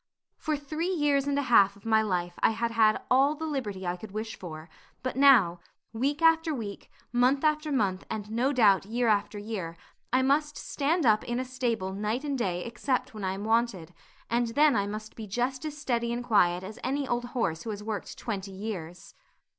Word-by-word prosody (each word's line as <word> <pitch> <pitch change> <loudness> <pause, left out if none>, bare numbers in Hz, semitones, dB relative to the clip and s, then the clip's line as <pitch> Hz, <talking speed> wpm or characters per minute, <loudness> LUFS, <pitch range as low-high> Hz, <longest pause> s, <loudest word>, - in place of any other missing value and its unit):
For 310 -2 -2
three 310 +5 -3
years 290 -6 +1
and 285 0 +1
a 285 - +1
half 200 -6 +5
of 200 - -20
my 220 -1 +4
life 180 -4 -1
I - - +4
had 230 +1 -1
had 220 -2 +3
all 275 +4 +4
the 320 +1 -5
liberty 215 -11 -3
I 175 0 -2
could 215 +4 -9
wish 220 +2 -5
for; 160 -3 -9 0.4
but 255 - -2
now, 245 -11 +5 0.3
week 280 +8 -1
after 325 -1 +4
week, 210 -5 -7 0.2
month 250 +4 +3
after 305 0 +1
month, 200 -8 0
and 210 -1 -5
no 245 +5 +1
doubt 210 -8 +4
year 240 +2 0
after 210 -1 +1
year, 200 -6 -5 0.3
I 255 +1 +3
must 295 +2 +1
stand 310 +2 0
up 215 -2 +4
in 240 +1 -2
a 255 - -2
stable 235 -7 -2
night 215 +6 -2
and 285 -2 -2
day 180 -8 -2
except 245 +2 -2
when 215 -2 -7
I 190 0 0
am 195 +1 -6
wanted, 220 -7 0 0.3
and 235 +1 +1
then 295 0 +5
I 200 0 +1
must 215 +1 -7
be 220 -2 -7
just 250 +7 -2
as 300 -1 -5
steady 235 -5 -1
and 240 +1 -3
quiet 180 -6 +3
as 210 +3 -8
any 275 +2 -1
old 240 0 -1
horse 165 -8 0
who 230 - -6
has 210 -1 -5
worked 215 -2 -5
twenty 200 -3 -4
years. 190 -4 -7
230 Hz, 205 wpm, -28 LUFS, 200-275 Hz, 0.4 s, half